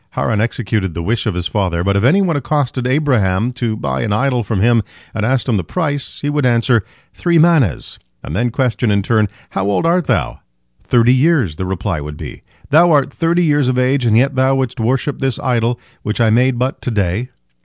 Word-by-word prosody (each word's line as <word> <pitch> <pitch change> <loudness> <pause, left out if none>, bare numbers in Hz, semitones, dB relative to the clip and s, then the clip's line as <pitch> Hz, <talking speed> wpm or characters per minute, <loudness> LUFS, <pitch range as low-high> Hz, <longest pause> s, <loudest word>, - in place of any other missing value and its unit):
Haran 110 -3 0
executed 110 -5 -2
the 85 - -4
wish 115 +4 -1
of 105 - -1
his 90 -1 -3
father, 90 -4 -1
but 100 +1 +1
if 100 - +1
any 185 +11 +4
one 170 -4 0
accosted 135 -2 -1
Abraham, 125 -7 +1
to 120 -3 -3
buy 65 -7 -2
an 105 - -2
idol 125 +3 +1
from 105 -2 -2
him, 115 +2 +3 0.3
and 110 - -3
asked 130 +3 0
him 115 -5 +1
the 95 - -2
price, 145 - -3
he 145 - -2
would 145 -1 0
answer, 120 -1 +2 0.3
"Three 170 -1 +1
manehs," 160 - +2 0.2
and 75 - -6
then 120 +5 +1
question 125 -1 0
in 100 -1 +1
turn, 110 0 +2 0.2
"How 95 0 -2
old 100 - 0
art 170 -1 +1
thou?" 60 -7 -1 0.4
"Thirty 120 0 +3
years," 130 - +2
the 95 - -3
reply 85 -4 -3
would 75 0 -7
be. - - -9 0.3
"Thou 170 +4 +5
art 145 -3 +2
thirty 170 +1 +1
years 145 -3 +2
of 130 -1 0
age, 130 +1 +1
and 110 -1 +3
yet 135 +4 +2
thou 130 +1 +2
wouldst 130 -3 -2
worship 130 +5 -1
this 135 -3 -1
idol 120 -1 0 0.2
which 105 +2 -3
I 115 -2 +3
made 125 +2 +2
but 130 +2 -2
to - - -3
day?" 105 +2 -1
120 Hz, 215 wpm, -16 LUFS, 105-135 Hz, 0.4 s, Thou